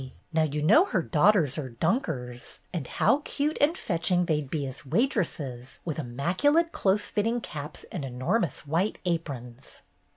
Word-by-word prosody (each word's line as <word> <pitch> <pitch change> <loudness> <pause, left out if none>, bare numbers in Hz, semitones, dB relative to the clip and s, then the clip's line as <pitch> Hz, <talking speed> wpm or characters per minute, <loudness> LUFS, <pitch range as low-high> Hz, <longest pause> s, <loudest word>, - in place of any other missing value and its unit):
Now 160 - +3
you 150 -1 0
know 310 - +6
her 185 - 0
daughters 155 -4 +3
are 135 -3 -4
Dunkers, 125 - -2
and 160 -8 -3
how 285 - +3
cute 300 +1 -1
and 315 +5 +3
fetching 180 0 +1
they'd 150 -4 0
be 145 -2 -2
as 130 0 -7
waitresses 145 - -1
with 160 -3 -3
immaculate 185 - +1
close 200 - +1
fit 210 - +1
ting 235 +2 +1
caps 150 -7 -7
and 170 - -4
enormous 135 - -1
white 170 +8 0
aprons!" 135 -8 -4
160 Hz, 155 wpm, -28 LUFS, 135-210 Hz, -, know